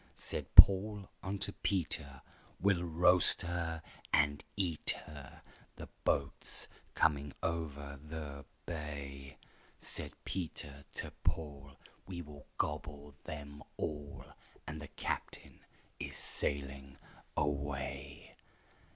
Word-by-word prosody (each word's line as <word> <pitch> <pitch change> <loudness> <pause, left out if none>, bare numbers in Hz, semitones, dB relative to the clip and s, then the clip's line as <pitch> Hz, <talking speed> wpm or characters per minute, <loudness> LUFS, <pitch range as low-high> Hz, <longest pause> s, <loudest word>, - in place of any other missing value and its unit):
Said - - -4
Paul 100 0 +9
unto 100 +1 -2
Peter, 80 -9 0 0.4
"We'll 95 -3 +3
roast 90 +2 +5
her 85 -2 -2 0.3
and 75 -1 +4
eat 85 -5 +1
her, 75 -3 -10 0.3
The - - -8 0.2
boat's - - 0 0.3
coming 75 -3 +3
over 75 -4 -2
the 75 -3 -6 0.2
bay." 70 -4 -5 0.4
Said - - -4
Peter 75 -6 -4
to - - -3
Paul, 70 -3 -2 0.3
"We 90 -2 -4
will 75 -1 -12
gobble 75 0 -2
them 75 -1 -6 0.2
all, 75 -2 -4 0.4
And 75 0 -5
the 75 - -6
captain - - -4 0.4
is - - -4
sailing 70 -1 -1 0.4
away!" 70 -1 -2
75 Hz, 100 wpm, -35 LUFS, 70-85 Hz, 0.4 s, Paul